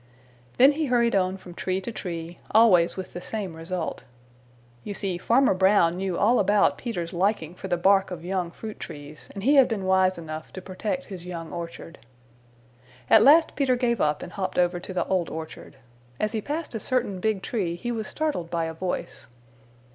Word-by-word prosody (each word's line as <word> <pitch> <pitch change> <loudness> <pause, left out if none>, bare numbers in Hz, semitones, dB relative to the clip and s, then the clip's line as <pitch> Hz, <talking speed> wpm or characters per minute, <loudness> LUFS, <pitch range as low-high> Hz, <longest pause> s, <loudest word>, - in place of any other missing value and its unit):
Then 265 +3 +7
he 305 +1 -2
hurried 235 -3 +2
on 185 0 +1
from 180 -2 -12
tree 185 +1 -2
to 215 - -5
tree, 170 -5 -6
always 195 -7 +5
with 190 - -6
the 175 - -6
same 195 -6 -5
result. 165 +1 -4 0.8
You 205 - -5
see 185 -3 -3
Farmer 245 +5 +3
Brown 190 -2 +4
knew 190 -2 -2
all 235 +4 +3
about 205 0 +3
Peter's 180 -9 -4
liking 180 -2 0
for 185 - -8
the 175 -2 0
bark 195 +2 +4
of 175 -2 -7
young 185 -2 -1
fruit 215 +5 -9
trees, 145 +1 -9
and 195 - -6
he 280 +5 +4
had 270 - +7
been 205 -5 -3
wise 190 -1 +3
enough 155 -1 -7
to - - -6
protect 205 +8 -4
his 180 -3 -9
young 170 -2 -6
orchard. 170 0 -7 1.1
At 220 - +8
last 310 +7 +6
Peter 270 -3 +2
gave 235 -3 0
up 150 -1 +1
and - - -8
hopped 190 -1 -4
over 175 0 +2
to 185 - -8
the 185 - -1
Old 185 -3 0
Orchard. 160 -2 -8 0.4
As 215 - 0
he 220 -1 -2
passed 300 +5 -4
a 225 - -3
certain 235 -6 -1
big 210 -1 -1
tree 190 -8 -2
he 240 +8 -4
was 220 -2 -3
startled 295 - -2
by 170 -1 -1
a 160 - -4
voice. 180 +3 -4
190 Hz, 195 wpm, -25 LUFS, 175-220 Hz, 1.1 s, At